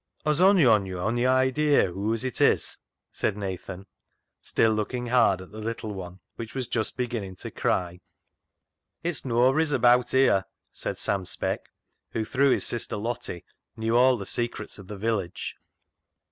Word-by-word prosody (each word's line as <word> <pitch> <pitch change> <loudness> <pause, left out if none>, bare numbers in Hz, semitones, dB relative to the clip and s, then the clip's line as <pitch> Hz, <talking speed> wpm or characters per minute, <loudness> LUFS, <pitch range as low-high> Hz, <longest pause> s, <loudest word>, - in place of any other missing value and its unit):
" - - -38
Has 150 +2 +2
ony 190 -5 +6
on 105 -5 +4
yo' 95 -1 -5
ony 120 +6 +1
idea 130 -2 +3
whoase 110 +6 -2
it 130 - -2
is? - - +2 0.2
" - - -58
asked 105 - +2
Nathan, 95 -1 -6 0.6
still 110 - +2
looking 110 +3 -2
hard 120 -6 +3
at 95 - -16
the 110 - -9
little 110 -1 -4
one, 90 -1 -8 0.2
which 115 +1 -7
was 130 -2 -1
just 115 -3 -2
beginning 115 -7 -3
to - - -8
cry. 90 -1 -1 0.5
" - - -55
It's 170 -1 -1
noabry's 130 +6 +3
abaat 125 -1 +4
here," 130 -8 +3 0.3
said - - -4
Sam 95 -2 -1
Speck, - - -3 0.4
who, 110 - -1
through 140 +4 +2
his - - +2
sister 120 -3 -1
Lottie, 105 -5 -4 0.3
knew 115 +1 0
all 125 +1 +5
the 100 - -6
secrets 120 -2 -4
of 95 - -11
the 105 - -7
village. 100 -4 -2
115 Hz, 170 wpm, -26 LUFS, 100-125 Hz, 0.6 s, ony